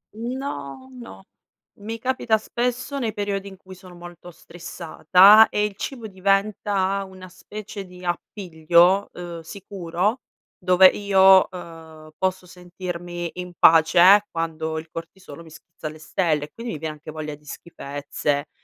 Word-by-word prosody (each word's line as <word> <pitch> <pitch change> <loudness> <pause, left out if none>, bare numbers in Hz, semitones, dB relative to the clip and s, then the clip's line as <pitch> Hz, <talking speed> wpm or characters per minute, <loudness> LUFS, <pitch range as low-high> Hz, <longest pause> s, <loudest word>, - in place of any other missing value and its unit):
Mhmm 235 +4 -5
no, 140 - -7
no. 95 -3 -12 0.6
Mi 220 +3 -6
capita 235 -2 0
spesso 250 +5 -3
nei 225 -4 -2
periodi 200 -1 -3
in 190 -1 -11
cui 185 0 -14
sono 185 -1 -14
molto 175 0 -12
stressata 180 +5 +4
e 210 - 0
il 210 -1 -5
cibo 240 +2 -6
diventa 195 0 0
una 185 -1 -12
specie 205 +2 -9
di 180 0 -13
appiglio, 175 +1 +1
ehm, 175 -1 -8
sicuro 195 +4 -3 0.3
dove 185 +1 +4
io, 190 -1 +5
ehm, 160 -3 -12
posso 185 -1 -2
sentirmi 175 -1 -7
in 180 0 -7
pace 175 +5 +6
quando 160 -1 -4
il 160 +1 -7
cortisolo 165 -1 -10
mi 165 - -14
schizza 160 0 -11
alle 155 +1 -9
stelle 155 -1 -1
e 150 - -20
quindi 235 +1 -6
mi - - -5
viene 155 0 -4
anche 150 0 -13
voglia 155 -1 -6
di 150 +1 -25
schifezze, 145 -1 -4
180 Hz, 145 wpm, -23 LUFS, 165-200 Hz, 0.6 s, pace